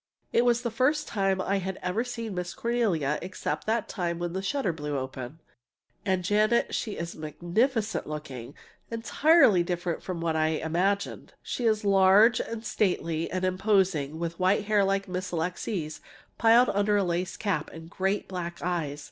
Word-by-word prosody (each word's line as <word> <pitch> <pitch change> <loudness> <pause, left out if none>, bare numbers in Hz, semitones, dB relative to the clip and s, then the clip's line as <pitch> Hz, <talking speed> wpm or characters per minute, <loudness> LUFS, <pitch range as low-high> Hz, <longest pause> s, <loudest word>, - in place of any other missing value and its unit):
It 235 - +4
was 240 0 +2
the 235 - -1
first 260 +6 +1
time 195 -3 0
I 195 +1 0
had 190 0 -4
ever 180 +6 0
seen 230 -4 -5
Miss 180 -1 -4
Cornelia 195 - 0
(except 185 +3 -4
that 225 0 0
time 175 -4 -2
when 175 0 -3
the 190 - -2
shutter 200 -2 -1
blew 150 -2 -3
open), 130 +2 -6 0.6
and, 190 -2 0
Janet, 215 +5 +2
she 215 - -2
is 170 -2 -5
magnificent 210 - -1
looking 140 -4 -7 0.3
entirely 230 - +4
different 175 -1 -2
from 180 -3 -5
what 165 -1 -1
I 155 0 +2
had 155 - -3
imagined! 185 +5 -1
She 245 - -3
is 215 -1 +1
large 200 +4 +6
and 230 0 -5
stately 170 -6 0
and 185 0 -1
imposing, 185 -6 +1
with 170 +1 -4
white 190 +3 +2
hair 210 -1 +3
like 195 0 0
Miss 185 +1 -4
Alixe's, 170 -1 -3 0.4
piled 235 +2 +6
under 205 +1 +2
a 200 - +2
lace 180 +1 -2
cap, 200 -3 -1
and 165 0 -10
great 190 +4 -1
black 175 -2 -5
eyes. 165 -5 -2
190 Hz, 170 wpm, -27 LUFS, 170-215 Hz, 0.6 s, large